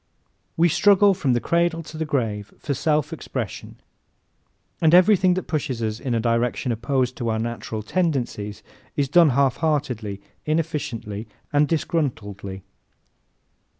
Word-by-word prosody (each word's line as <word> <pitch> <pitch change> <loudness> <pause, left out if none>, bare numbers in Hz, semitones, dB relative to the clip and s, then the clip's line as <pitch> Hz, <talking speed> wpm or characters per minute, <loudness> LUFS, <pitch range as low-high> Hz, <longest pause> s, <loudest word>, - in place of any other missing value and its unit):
We 170 +1 +5
struggle 200 +4 +5
from 140 -9 0
the 120 - +2
cradle 170 +3 +1
to 155 - -11
the 160 0 -2
grave 110 -8 -2
for 145 - -3
self 150 +2 0
expression 125 - -5 1.1
and 160 +1 +6
everything 185 -1 +5
that 185 - -2
pushes 130 -7 -2
us 110 0 -2
in 125 -2 -2
a - - +2
direction 120 +2 0
opposed 125 +2 0
to 120 -2 -2
our 110 - 0
natural 115 -1 -4
tendencies 120 - -2 0.3
is 140 -1 +1
done 165 +3 +6
half 135 0 +2
heartedly, 130 -11 -1 0.2
inefficiently 140 -10 -2 0.3
and 145 +1 +4
disgruntledly. 105 - -2
135 Hz, 135 wpm, -23 LUFS, 115-165 Hz, 1.1 s, and